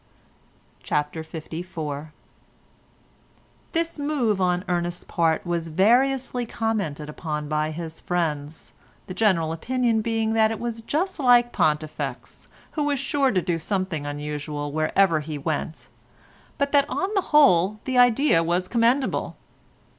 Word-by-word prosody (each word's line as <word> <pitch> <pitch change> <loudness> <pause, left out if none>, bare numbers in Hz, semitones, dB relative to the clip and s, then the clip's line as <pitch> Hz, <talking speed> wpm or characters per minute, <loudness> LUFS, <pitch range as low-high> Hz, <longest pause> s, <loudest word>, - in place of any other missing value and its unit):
CHAPTER 150 +2 -2
LIV 165 +3 -7 1.9
This 330 -1 -2
move 260 -9 0
on 180 +1 +1
Ernest's 175 0 -1
part 165 -1 0
was 170 -1 -2
variously 245 +7 +2
commented 200 -11 -2
upon 150 -1 -4
by 155 +1 0
his 160 0 -7
friends, 160 -3 -3 0.3
the 185 - -7
general 185 -6 +2
opinion 230 +6 0
being 225 0 0
that 220 -1 +4
it 225 - -4
was 230 -1 -4
just 335 +11 -1
like 245 -2 +5
Pontifex, 155 0 -2 0.2
who 300 -2 -1
was 290 -1 +1
sure 275 0 +1
to 185 -7 +1
do 175 -3 -1
something 185 -5 -2
unusual 145 0 -4
wherever 155 +3 +2
he 150 0 -5
went, 155 +2 -4 0.7
but 280 -1 0
that 285 0 +3
on 380 - -1
the 390 - +2
whole 200 - +5
the 255 -1 +1
idea 245 - +4
was 175 +2 0
commendable. 240 +5 +1
185 Hz, 130 wpm, -24 LUFS, 160-245 Hz, 1.9 s, like